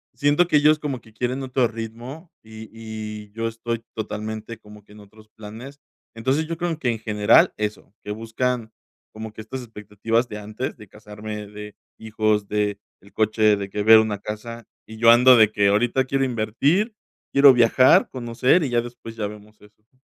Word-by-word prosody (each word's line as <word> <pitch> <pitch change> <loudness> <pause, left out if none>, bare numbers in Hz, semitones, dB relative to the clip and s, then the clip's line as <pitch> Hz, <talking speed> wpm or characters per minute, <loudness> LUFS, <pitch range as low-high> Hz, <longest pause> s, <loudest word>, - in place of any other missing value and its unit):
siento 145 +5 +2
que 155 - +3
ellos 150 +1 +4
como 140 -5 -4
que 110 - -21
quieren 125 +4 -3
otro 130 -2 +1
ritmo 120 +9 -8
y 110 0 -12
y 110 -2 -8
yo 115 +1 -3
estoy 115 0 -5
totalmente 110 +1 -5
como 105 -1 -16
que 105 - -19
en 105 - -14
otros 110 +1 -18
planes. 115 +8 -11 0.4
Entonces, 130 +7 -1
yo 165 0 -4
creo 170 -1 -2
que 125 - -1
en 115 -2 -2
general 105 -2 +3
eso, 105 -1 -5
que 105 - -6
buscan, 115 +1 -3 0.4
como 110 0 -8
que 110 - -10
estas 125 +4 -7
expectativas 110 +1 -2
de 105 -2 -7
antes, 105 +5 -5
de 105 - -14
casarme, 105 +1 -9
de 105 0 -10 0.2
hijos, 110 -2 -1
de 105 -1 -1 0.2
el 100 - -20
coche 110 -1 +2
de 100 0 -5
que 105 +1 -3
ver 110 +1 +8
una 110 -2 -1
casa 115 +2 -7 0.2
y 110 - -11
yo 115 +1 +6
ando 125 +2 +7
de 110 -1 +5
que, 100 -2 +2
ahorita 120 +6 +1
quiero 135 0 0
invertir, 140 - 0 0.4
quiero 140 -1 +7
viajar, 125 +2 +4
conocer 125 +6 +1
y 140 - -2
ya 120 -1 +1
después 120 -1 -10
ya 105 -2 -3
vemos 105 +1 -13
eso, 105 +1 -22
¿no? 130 - -36
110 Hz, 190 wpm, -22 LUFS, 105-125 Hz, 0.4 s, ver